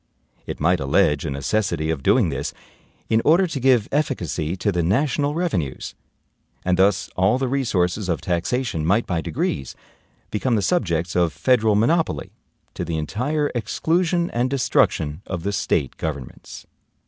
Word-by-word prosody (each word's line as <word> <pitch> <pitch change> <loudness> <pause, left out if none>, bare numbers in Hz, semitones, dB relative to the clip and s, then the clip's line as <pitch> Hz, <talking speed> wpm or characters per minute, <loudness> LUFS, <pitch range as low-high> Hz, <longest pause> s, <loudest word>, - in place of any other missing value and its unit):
It - - -5
might 85 +3 +2
allege 70 +1 +2
a - - -2
necessity 80 +3 -1
of 75 -4 -3
doing 105 - +3
this 70 0 -4 0.5
in 110 0 +2
order 170 +5 +5
to 160 -6 -4
give 125 -4 +3
efficacy 95 - -1
to 100 +2 0
the 90 -2 0
national 145 - +1
revenues. 95 - -2 0.7
And 90 0 +3
thus 95 0 +3
all 95 +6 +3
the 135 0 -1
resources 105 -8 0
of 85 - 0
taxation 90 +1 -1
might 100 +8 +2
by 85 -3 -1
degrees 65 -3 -3 0.6
become 115 +3 0
the 105 - 0
subjects 85 - 0
of 85 -3 +2
federal 110 - +2
monopoly, 160 +11 +1 0.4
to - - -4
the 85 -1 -3
entire 145 - -1
exclusion 170 - 0
and 120 +2 0
destruction 85 - +1
of 90 -3 -4
the 100 - -1
State 70 -8 -1
governments." 70 -6 -6
100 Hz, 150 wpm, -22 LUFS, 80-130 Hz, 0.7 s, order